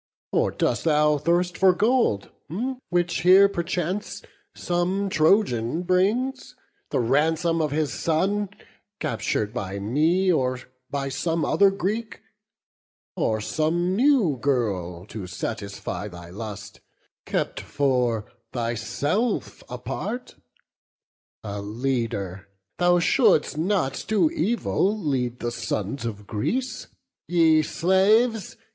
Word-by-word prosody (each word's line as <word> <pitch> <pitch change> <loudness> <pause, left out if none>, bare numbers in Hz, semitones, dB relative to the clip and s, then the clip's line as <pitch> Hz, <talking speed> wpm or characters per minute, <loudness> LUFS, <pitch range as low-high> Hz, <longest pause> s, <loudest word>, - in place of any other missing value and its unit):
Or - - +2
dost - - -1
thou 150 -1 +3
thirst 175 +3 +1
for 190 -1 +5
gold, 210 - +1 0.6
which 175 -1 0
here 190 +3 +7
perchance 180 +1 -3 0.3
Some 185 +3 -1
Trojan 155 - +2
brings, 230 +9 0 0.3
the - - 0
ransom 160 +7 +2
of 155 - +1
his 145 -2 -1
son 195 +5 0 0.5
Captur'd 105 0 -1
by 100 -4 -4
me, 155 - +2
or 130 -5 +1 0.3
by 140 -1 -2
some 160 +4 -1
other 195 +5 +4
Greek? 205 +4 -3 1.0
Or 110 -1 0
some 170 - 0
new 235 - +3
girl, 95 -11 -1
to 105 -3 -7
gratify 100 +2 -5
thy 85 -3 -10
lust, 105 0 -8 0.5
Kept - - -1
for 125 -6 0 0.3
thyself 120 - -1
apart? 245 +1 -5 1.1
a 100 -1 -5
leader, 105 -4 -3 0.3
thou 175 0 +4
Shouldst 160 -3 +3
not 160 -4 0
to 220 +9 +3
evil 220 - 0
lead 130 - -2
the 120 - -2
sons 115 +1 -3
of 105 -3 -5
Greece. 225 - -2 0.4
Ye 165 -2 +4
slaves! 195 +7 +2
155 Hz, 105 wpm, -24 LUFS, 115-190 Hz, 1.1 s, here